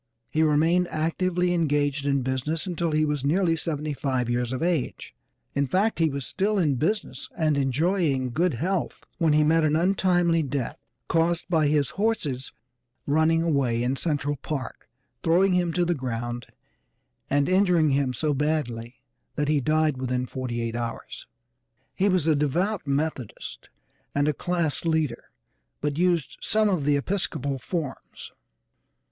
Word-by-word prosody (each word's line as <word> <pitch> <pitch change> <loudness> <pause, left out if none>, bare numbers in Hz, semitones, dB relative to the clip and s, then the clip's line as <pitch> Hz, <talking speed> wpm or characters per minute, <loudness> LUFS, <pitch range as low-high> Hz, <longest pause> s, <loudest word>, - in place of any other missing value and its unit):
He 155 - +1
remained 160 +4 +3
actively 175 +3 0
engaged 145 -3 +1
in 140 -2 +1
business 130 +5 -2
until 170 -2 -1
he 155 0 +2
was 150 -3 -1
nearly 165 +3 +2
seventy 155 -2 -2
five 130 -4 -1
years 120 0 -1
of 130 +4 -2
age, 170 -6 -2 0.4
in 140 0 +1
fact 195 - +1
he 165 -1 +3
was 140 -2 -4
still 205 +2 0
in 160 -7 +2
business 205 - -2
and 155 -3 +2
enjoying 140 -1 +1
good 165 +2 +1
health 180 +8 -2 0.2
when 160 -3 +3
he 150 0 +4
met 160 +1 +3
an 155 0 +2
untimely 175 -1 +2
death, 140 -3 -3 0.3
caused 170 +1 +1
by 160 -4 +3
his 145 -2 +1
horses 150 - -1 0.5
running 160 +3 +3
away 135 -7 +1
in 125 +2 0
Central 145 -1 0
Park, 135 -1 -6 0.3
throwing 180 +3 +3
him 175 -2 +1
to 175 +1 +1
the 175 - +1
ground 120 -3 -4 0.8
and 140 0 +2
injuring 180 -5 +3
him 135 -1 +1
so 150 +5 0
badly 130 -5 -2 0.3
that 145 0 0
he 150 -2 +2
died 155 0 +2
within 125 -1 -1
forty 125 -2 -4
eight 115 0 -3
hours. 120 -1 -5 0.7
He 195 +2 +2
was 185 -5 +2
a 160 - +4
devout 170 +6 0
Methodist, 140 -4 -3 0.5
and 145 +1 +2
a 150 - +2
class 170 0 -1
leader, 160 -7 0 0.5
but 145 +1 -2
used 175 -6 +1
some 215 0 +2
of 175 -8 0
the 145 -1 +3
Episcopal 140 -5 -2
forms. 145 +2 -5
155 Hz, 150 wpm, -25 LUFS, 135-170 Hz, 0.8 s, he